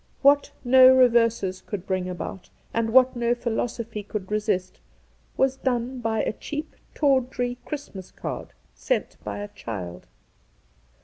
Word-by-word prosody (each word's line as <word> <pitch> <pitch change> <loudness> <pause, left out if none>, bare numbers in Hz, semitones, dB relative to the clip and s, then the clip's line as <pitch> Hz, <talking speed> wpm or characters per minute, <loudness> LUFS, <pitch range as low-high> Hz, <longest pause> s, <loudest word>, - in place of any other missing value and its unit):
What 285 +1 +5
no 255 +1 +8
reverses 230 -7 +3
could 195 -3 -6
bring 185 -1 -1
about, 180 +1 -6 0.2
and 230 -1 0
what 260 +1 +6
no 240 0 +1
philosophy 230 -2 -3
could 205 -1 -6
resist, 210 -4 -1 0.6
was 265 0 +2
done 250 0 -1
by 225 -2 0
a - - -1
cheap, 300 +6 -6 0.2
tawdry 250 -3 +1
Christ 290 -1 -6
mas 190 -2 -9
card - - -6 0.2
sent - - -2
by - - -4
a 205 0 -5
child. 90 - -7
235 Hz, 135 wpm, -25 LUFS, 205-255 Hz, 0.6 s, no